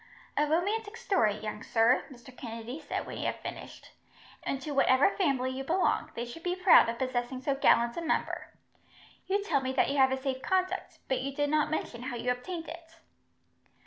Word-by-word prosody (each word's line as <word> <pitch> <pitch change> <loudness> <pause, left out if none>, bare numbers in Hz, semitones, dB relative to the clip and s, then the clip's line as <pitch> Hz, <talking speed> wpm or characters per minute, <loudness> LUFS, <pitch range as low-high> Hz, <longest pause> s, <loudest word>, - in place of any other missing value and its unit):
"A 295 - +2
romantic 410 +8 0
story, 385 - +2
young 215 -1 -5
sir," 230 +3 +3
Mr. 255 0 -13
Kennedy 230 +3 -7
said, - - -4
when - - -7
he - - -3
had - - -2
finished, - - -8 0.5
"and 275 - -2
to 290 +3 -6
whatever 275 +3 +4
family 275 -10 0
you 265 +1 -4
belong, 350 +7 +1
they 235 - -3
should 245 +7 -9
be 360 +1 -1
proud 365 -9 +6
of 230 - -3
possessing 255 0 -2
so 280 - +1
gallant 235 -3 +3
a - - -1
member. 325 - -1 0.8
You 400 +1 +1
tell 280 -9 +1
me 260 0 -2
that 265 - +2
you 285 - -1
have 265 -1 +5
a 265 - +1
safe 265 -1 -3
conduct, 370 0 -1
but 260 -1 0
you 275 +1 -4
did 290 0 0
not 305 -1 +2
mention 250 -6 -3
how 250 0 -4
you 240 +1 0
obtained 330 +7 -5
it." 330 0 -10
270 Hz, 200 wpm, -30 LUFS, 250-330 Hz, 0.8 s, proud